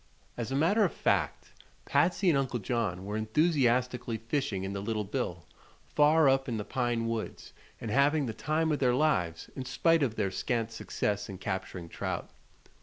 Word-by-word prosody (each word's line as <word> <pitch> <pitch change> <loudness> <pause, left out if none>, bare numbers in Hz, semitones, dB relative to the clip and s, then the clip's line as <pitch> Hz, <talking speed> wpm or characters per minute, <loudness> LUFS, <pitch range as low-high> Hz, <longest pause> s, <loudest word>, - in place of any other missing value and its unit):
As 120 +1 -4
a - - 0
matter 185 +10 +3
of 185 - +2
fact, - - 0 0.3
Patsy 175 +6 +2
and 160 - +4
Uncle 135 -2 0
John 105 -5 -2
were 105 +1 -4
enthusiastically 125 -1 +1
fishing 115 -4 -2
in 95 +1 -3
the 100 - -3
Little 105 +1 -1
Bill, 95 - -3 0.5
far 150 +1 +5
up 135 0 +3
in 115 - -1
the 105 - -4
pine 120 -1 -1
woods, 115 -1 -4 0.3
and 110 - -4
having 140 +4 +3
"the 115 - -3
time 155 +6 0
of 150 - 0
their 125 -2 +3
lives" 90 - 0
in 130 - -4
spite 165 +5 +2
of 120 -6 0
their 100 -4 0
scant 115 +2 -1
success 105 -2 -2
in 95 - -6
capturing 95 -2 -4
trout. - - -4
120 Hz, 180 wpm, -30 LUFS, 105-145 Hz, 0.5 s, far